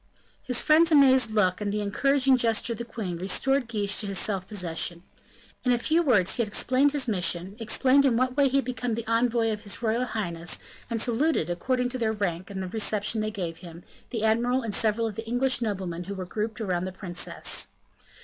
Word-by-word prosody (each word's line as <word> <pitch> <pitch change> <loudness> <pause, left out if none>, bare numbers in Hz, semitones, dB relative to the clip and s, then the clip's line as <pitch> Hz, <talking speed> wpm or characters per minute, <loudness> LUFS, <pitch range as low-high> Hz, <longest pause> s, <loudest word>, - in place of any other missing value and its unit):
His 250 -2 0
friend's 320 +2 +4
amazed 265 -5 +5
look, 210 -3 +1
and 205 -1 -1
the 210 +1 -1
encouraging 270 +6 +2
gesture 230 -1 +2
of 225 - -9
the 235 - -4
queen, 210 -7 -5
restored 245 +9 0
Guiche 205 -3 0
to 210 - -1
his 195 -1 -2
self 190 -1 -1
possession. 170 -3 0 0.6
In 250 - +2
a 245 - +3
few 320 +8 +2
words 205 - +3
he - - +2
explained 255 +6 +2
his 280 -3 0
mission, 180 -2 0
explained 255 +5 +3
in 255 -4 +2
what 255 +1 0
way 285 -1 +4
he 265 - -2
had 275 - 0
become 245 -2 -3
envoy 230 0 +1
of 210 -1 -4
his 210 +2 -5
royal 230 +3 +1
highness; 175 -7 -3 0.3
and 230 -1 -2
saluted, 240 - +1
according 250 +8 -1
to 255 0 -4
their 220 -2 0
rank 185 -4 -3
and 190 -1 -5
the - - -5
reception 215 +2 -1
they 215 - -1
gave 175 -6 -5
him, 170 -1 -12 0.3
the 225 -3 -3
admiral 240 +4 +1
and 220 -3 -3
several 225 +2 +1
of 220 - -3
the 225 0 -6
English 245 +1 +1
noblemen 185 -6 -3
who 200 +2 -6
were 185 -1 -5
grouped 215 +4 -4
around 185 -5 -2
the 185 - -4
princess. 180 -2 -3
220 Hz, 205 wpm, -26 LUFS, 190-250 Hz, 0.6 s, amazed